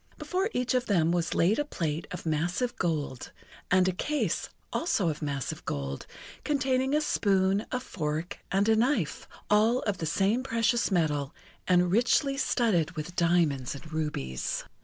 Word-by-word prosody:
Before 380 +3 -1
each 250 - 0
of 250 -1 +1
them 170 -5 +3
was 170 -1 0
laid 190 +9 +3
a - - +2
plate 165 - -3
of 180 - -7
massive 175 +10 0
gold, 150 -7 -2 0.4
and 185 0 +4
a - - +3
case 295 +11 -1 0.2
also 205 - +1
of 150 - -4
massive 140 -3 -3
gold 70 -1 -4 0.4
containing 265 -1 +1
a 305 - +3
spoon, 195 -6 +1
a 255 - 0
fork, 160 -7 -4
and 195 +2 +2
a 225 - +5
knife, 225 - 0 0.2
all 220 +4 +3
of 200 -4 -2
the 160 - -2
same 200 +9 +2
precious 230 -1 +1
metal, 150 -6 0 0.3
and 180 -1 +4
richly 245 +6 +3
studded 205 - +1
with 155 +3 -5
diamonds 165 -7 +2
and 155 +3 -11
rubies. 110 - -2
180 Hz, 160 wpm, -28 LUFS, 155-240 Hz, 0.4 s, a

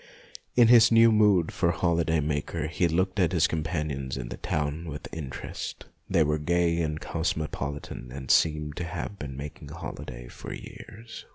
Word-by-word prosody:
In 120 -2 +6
his 120 -1 +8
new 115 0 +7
mood 105 -6 +4
of 85 0 +1
holiday 85 -2 +2
maker 75 +2 -2
he 85 +2 +1
looked 95 +4 0
at 90 -1 +3
his 85 -2 +4
companions 75 -5 -2
in - - -5
the - - -6
town 75 +2 -2
with 75 -1 -6
interest. 70 -5 -6 0.2
They 80 - +4
were 75 +1 +1
gay 85 +2 +1
and 75 -1 -2
cosmo 80 -1 -1
politan, 70 -3 -5
and 65 0 -3
seemed 75 -2 +2
to 90 - -2
have 90 +4 -5
been 70 -3 -6
making 75 +1 -8
holiday 70 -7 -7
for - - -9
years. 115 +1 -10
80 Hz, 170 wpm, -27 LUFS, 75-85 Hz, 0.2 s, his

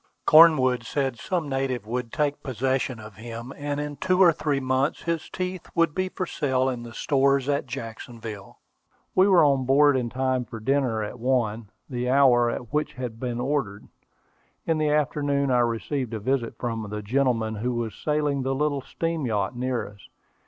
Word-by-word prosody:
Cornwood 135 -7 +6
said 135 -1 -2
some 175 -5 -2
native 135 -4 -2
would 120 +1 -3
take 145 -1 -1
possession 130 -1 -1
of 105 -3 -11
him, 115 +3 -7
and 145 0 -3
in 145 -1 -4
two 185 +6 +1
or 180 -3 +8
three 150 -3 -1
months 130 +2 0
his 170 -1 -2
teeth 185 -1 -5
would 165 -2 +3
be 185 +2 -1
for 185 - -3
sale 130 -6 0
in 125 -2 -4
the 120 0 -9
stores 140 +1 +1
at 140 -1 0
Jacksonville. 115 -4 -8 0.6
We 190 +1 +5
were 185 -5 +6
on 135 -2 +2
board 145 +1 +5
in 125 -2 -1
time 130 0 0
for 115 -1 -9
dinner 125 -2 0
at 105 +4 -7
one, 115 -4 0 0.2
the 125 -1 -3
hour 125 -3 +5
at 120 +2 -6
which 150 0 0
it - - -25
had 120 -3 -5
been 120 -1 -3
ordered. 125 -6 -2 0.8
In 165 -1 +1
the 155 -1 +1
afternoon 145 -2 +1
I 125 - +4
received 120 +1 -1
a - - -3
visit 120 +1 -1
from 115 -3 -4
the 105 0 -5
gentleman 115 -1 +1
who 120 +3 -2
was 115 -3 -3
sailing 150 -2 -1
the 135 +1 -1
little 145 0 0
steam 165 0 -3
yacht 105 0 -1
near 125 -3 -2
us. 100 0 -15
130 Hz, 185 wpm, -25 LUFS, 120-145 Hz, 0.8 s, or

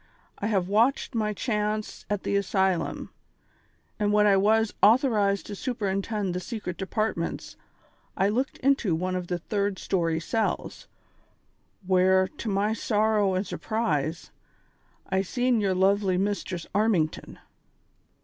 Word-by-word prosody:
I 205 - -1
have 195 -5 0
watched 230 +8 +2
my 215 -2 0
chance 210 -1 -3
at 205 -2 -2
the - - -1
asylum, 190 -2 0 0.9
and 205 -1 +1
when 210 0 +4
I 200 -1 +5
was 215 +3 +3
author 240 +3 +5
ized 200 -1 +1
to 205 - -6
superintend 200 -3 -2
the 180 - -2
secret 185 -2 -6
departments, 190 -3 -3 0.6
I 195 - +3
looked 255 +6 -1
into 260 -10 +2
one 185 +2 -2
of 180 -1 -3
the 175 - -1
third 200 +2 -2
story 165 -4 0
cells, 220 +6 -2 1.0
where, 185 0 +4
to 220 - -6
my 205 +2 +1
sorrow 215 -3 +1
and 185 +2 -1
sur - - -6
prise, 165 -8 -2 0.8
I 190 0 +1
seen 245 +3 0
yer 195 -2 +1
luvly 190 0 +2
Mistress 195 -3 -2
Armington." 200 -7 0
200 Hz, 135 wpm, -26 LUFS, 185-215 Hz, 1.0 s, I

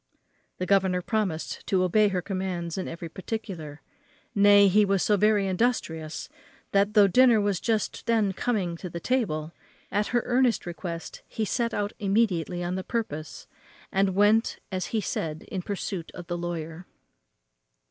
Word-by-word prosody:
The 185 - -2
governor 190 -2 +2
promised 195 -8 -2
to 185 -2 +2
obey 210 +4 +4
her 185 -3 -1
commands 185 -4 -3
in 190 - -3
every 170 0 -6
particular; 180 -5 -6 0.5
nay, 205 0 +7
he 210 +3 +5
was 195 -2 +2
so 210 - +3
very 210 0 +3
industrious, 180 -6 -1 0.4
that, 200 +2 +2
though 205 -1 +8
dinner 240 +3 +5
was 200 -3 0
just 225 +1 -1
then 220 -4 +2
coming 185 -7 -1
upon 180 - -4
the 170 - -3
table, 170 -9 -1 0.4
at 205 +2 +1
her 240 -2 +1
earnest 250 -1 +2
request 170 -1 -6
he 220 - -2
set 235 +3 0
out 205 -1 -2
immediately 195 -5 +1
on 175 +1 -2
the 190 0 -3
purpose, 155 - -4 0.5
and 195 -1 +1
went 210 +3 +3
as 185 -1 -2
he 220 - -1
said 160 -4 -3
in 190 - -3
pursuit 190 -2 -4
of 175 - -8
the 175 0 -3
lawyer. 170 0 -5
195 Hz, 160 wpm, -27 LUFS, 175-215 Hz, 0.5 s, though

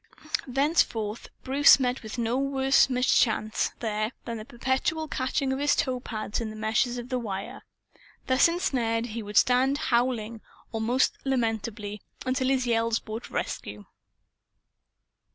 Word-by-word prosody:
Thenceforth, 250 -6 0 0.2
Bruce 275 +2 +6
met 250 -1 -1
with 220 +2 -7
no 235 0 0
worse 270 0 +3
mischance, 245 -4 +2
there, 215 -1 -1
than 235 -1 -4
the 215 - -8
perpetual 265 +6 -1
catching 265 0 -1
of 265 - -3
his 290 +1 +3
toe 255 -2 0
pads 215 -2 -4
in 225 - -3
the 215 - -8
meshes 220 +3 0
of 240 +1 -7
the 255 -1 -1
wire. 195 -4 -5 0.6
Thus 260 +4 +5
ensnared 240 -9 0
he 230 +1 -4
would 210 0 -4
stand, 260 +2 +4
howling 235 -5 0 0.3
most 230 +4 +1
lamentably, 225 -5 -2 0.2
until 260 0 0
his 260 -1 +1
yells 230 -1 +1
brought 220 +2 -7
rescue. 105 0 -4
240 Hz, 135 wpm, -27 LUFS, 220-265 Hz, 0.6 s, Bruce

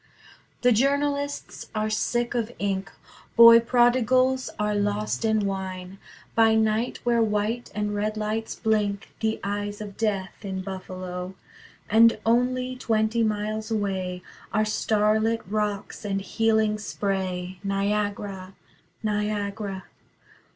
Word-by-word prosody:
The 250 - +6
journalists 285 +4 0
are 215 0 0
sick 240 +2 0
of 235 -1 -1
ink: 195 -1 -2 0.4
Boy 230 0 +10
prodigals 255 +2 +3
are 210 0 0
lost 205 +2 -1
in 220 -2 +2
wine, 190 -1 -4 0.3
By 225 -1 +5
night 220 +2 +1
where 235 -1 +2
white 220 +2 -1
and 210 0 -1
red 210 +1 -1
lights 215 +1 -2
blink, 210 -2 0
The 220 0 0
eyes 205 +1 -3
of 205 -2 -8
Death, 200 -4 -2
in 190 -2 -4
Buffalo. 185 -1 -6 0.5
And 230 +1 +6
only 250 +2 +1
twenty 225 -2 +1
miles 215 0 -1
away 190 -4 -2 0.3
Are 215 0 +2
starlit 215 +1 +1
rocks 210 0 -2
and 195 -2 -1
healing 220 +1 +1
spray: 190 -3 -3
Niagara, 200 -1 -2 0.5
Niagara. 205 -2 -2
210 Hz, 115 wpm, -25 LUFS, 200-225 Hz, 0.5 s, Boy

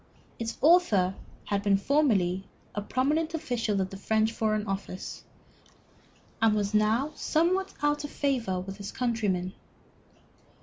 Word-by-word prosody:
Its 230 0 -4
author 265 - +5 0.3
had 200 -1 0
been 200 -1 +3
formerly 195 -8 +2 0.3
a 205 - -2
prominent 300 +9 0
official 240 -10 -1
of 190 0 -1
the 195 - -7
French 220 +2 +1
Foreign 215 -2 0
Office, 195 -2 -5 1.2
and 225 -1 +4
was 205 0 -1
now 220 +7 +2
somewhat 370 +5 +1
out 295 0 +2
of 290 - -5
favor 245 -12 -1
with 195 +2 -7
his 200 -1 -6
countrymen. 205 -7 -1
220 Hz, 130 wpm, -28 LUFS, 195-285 Hz, 1.2 s, author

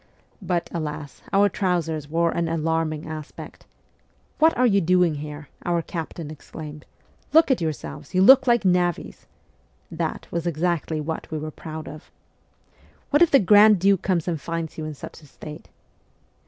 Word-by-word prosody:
But, 175 -2 -1
alas, 150 -3 -5
our 200 +1 +4
trousers 165 -6 -2
wore 170 +1 +1
an 170 -1 -1
alarming 160 -1 -1
aspect. 155 -2 -9 0.3
' - - -39
What 320 +1 +4
are 250 - +4
you 200 -4 +3
doing 175 -4 +2
there? 150 0 -8
' - - -23
our 170 -1 0
captain 165 -2 -6
exclaimed. 150 0 -10 0.2
' - - -35
Look 320 -2 +6
at 255 - +1
yourselves! 155 0 -5
You 185 - +5
look 265 +5 +7
like 235 -4 +3
navvies 180 -2 0 0.3
' - - -38
(that - - -3
was 170 0 -2
exactly 165 -1 -1
what 160 +1 -5
we 155 - -3
were 155 +1 -5
proud 155 -1 -8
of). 155 0 -11 0.5
' - - -32
What 290 +2 +3
if 345 - +7
the 275 - +6
Grand 210 0 +6
Duke 195 0 +3
comes 180 -4 0
and 165 -4 -2
finds 165 0 -4
you 155 - -5
in 155 -1 -6
such 140 - -10
a 150 - -16
state 150 +2 -11
165 Hz, 180 wpm, -23 LUFS, 155-185 Hz, 0.5 s, look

